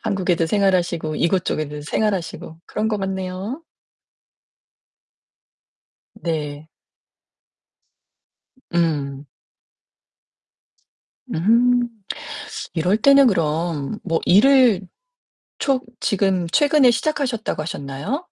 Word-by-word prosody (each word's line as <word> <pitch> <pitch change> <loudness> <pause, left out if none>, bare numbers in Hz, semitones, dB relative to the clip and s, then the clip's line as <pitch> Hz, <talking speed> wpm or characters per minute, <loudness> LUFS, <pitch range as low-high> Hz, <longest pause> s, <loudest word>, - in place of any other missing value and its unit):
한국에도 180 -4 0
생활하시고 175 -5 +1
이곳 180 +2 +1
쪽에도 150 -1 -3
생활하시고 170 -1 -3
그런 215 +1 -2
것 215 -1 -1
같네요. 190 - -4 2.5
네. 155 -2 -4 2.1
음. 145 -5 0 2.0
음 240 +7 +3 0.8
이럴 180 +4 +1
때는 275 +4 +6
그럼 165 - -1
뭐 165 -3 -1
일을 240 -1 +5 0.8
초 270 -2 +1 0.2
지금 190 -3 +1
최근에 290 -3 +5
시작하셨다고 245 - -1
하셨나요? 145 - -4
185 Hz, 175 characters per minute, -21 LUFS, 160-230 Hz, 2.5 s, 때는